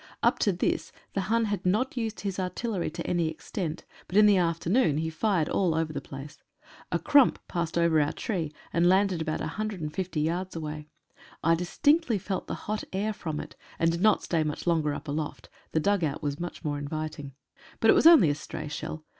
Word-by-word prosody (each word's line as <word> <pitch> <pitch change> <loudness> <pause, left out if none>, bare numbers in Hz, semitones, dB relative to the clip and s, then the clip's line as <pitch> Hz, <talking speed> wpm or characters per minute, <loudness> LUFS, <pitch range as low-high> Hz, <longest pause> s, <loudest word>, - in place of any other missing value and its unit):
Up - - +3
to 205 - +3
this 180 - -1 0.2
the 195 - 0
Hun 230 0 +3
had 205 -3 -2
not 215 +10 +1
used 225 -3 -3
his 195 -2 -3
artillery 185 +1 -2
to 170 +2 -6
any 170 -2 +1
extent, 160 +1 -5 0.2
but 190 - -1
in 210 - +8
the 205 -1 +6
afternoon 170 - +2
he 160 +1 -1
fired 170 -1 +1
all 175 -5 +1
over 160 -1 -1
the - - -3
place. 135 +2 -9 0.5
A - - +2
"Krump" 285 -3 +5
passed 170 -1 -2
over 170 -2 +4
our 145 - +1
tree, 175 - -3 0.2
and 170 +1 +4
landed 190 -2 +3
about 155 -1 -2
150 185 -3 -3
yards 175 +4 -1
away. 150 -1 -5 0.6
I 165 - +4
dis 175 +1 -3
tinctly 290 -8 +3
felt 190 0 -4
the - - -3
hot 215 0 -2
air 205 +3 -1
from 155 -6 -4
it, - - -8 0.2
and 165 0 +3
did 170 +1 -3
not 215 +1 +4
stay 165 -3 +1
much 150 -1 -4
longer 160 -4 +1
up - - -8
aloft 150 +1 -4
— - - -34
the 160 - +2
dugout 165 -5 0
was 145 0 -2 0.2
more 145 -2 -2
inviting. 145 -1 -5 0.5
But 225 - +6
it - - +6
was - - +6
only 265 - +8
a - - +1
stray 150 0 -6
shell. 155 +1 -6
170 Hz, 205 wpm, -28 LUFS, 155-200 Hz, 0.6 s, in